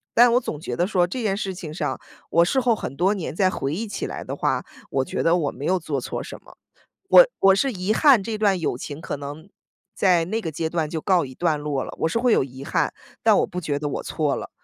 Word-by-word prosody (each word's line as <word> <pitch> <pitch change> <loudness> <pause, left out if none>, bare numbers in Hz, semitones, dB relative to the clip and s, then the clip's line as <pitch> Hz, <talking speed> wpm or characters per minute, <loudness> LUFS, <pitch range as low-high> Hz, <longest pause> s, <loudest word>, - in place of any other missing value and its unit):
但 240 0 +7
我 245 - +5
总 150 - -5
觉 160 - -4
得 175 +2 +1
说 180 -4 +2
这 245 +8 -4
件 205 -4 0
事 195 -2 -3
情 170 -4 -8
上 - - -3 0.3
我 170 0 +4
事 265 +9 +1
后 245 -3 +2
很 135 - -6
多 190 +4 +3
年 185 -8 -4
再 185 0 +3
回 140 -4 -3
忆 220 +6 -3
起 200 - -4
来 - - -6
的 - - -5
话， - - 0 0.3
我 135 -1 0
觉 - - -3
得 165 +1 +4
我 150 -4 -1
没 140 - -7
有 185 +3 +2
做 145 -4 -3
错 - - -4
什 - - -8
么。 - - -17 0.5
我 - - +9
我 195 0 +7
是 270 +6 +1
遗 190 +3 -1
憾 265 -9 +5
这 220 0 -3
段 205 -3 +2
友 150 -7 -1
情 145 +4 -7
可 145 - -4
能 145 +6 -8 0.5
在 180 -4 +3
那 215 +6 -2
个 165 - -3
阶 160 +2 -2
段 160 -2 -1
就 160 0 -4
告 180 -4 +2
一 130 -1 -11
段 160 -4 0
落 145 -3 -2
了， - - -8
我 - - +2
是 230 - -1
会 245 0 +2
有 - - +4
遗 130 0 -9
憾， - - 0 0.3
但 - - +5
我 - - +2
不 180 - -5
觉 145 -3 -2
得 145 - -3
我 - - -3
错 150 -3 -1
了， - - -7
175 Hz, 285 characters per minute, -23 LUFS, 150-205 Hz, 0.5 s, 我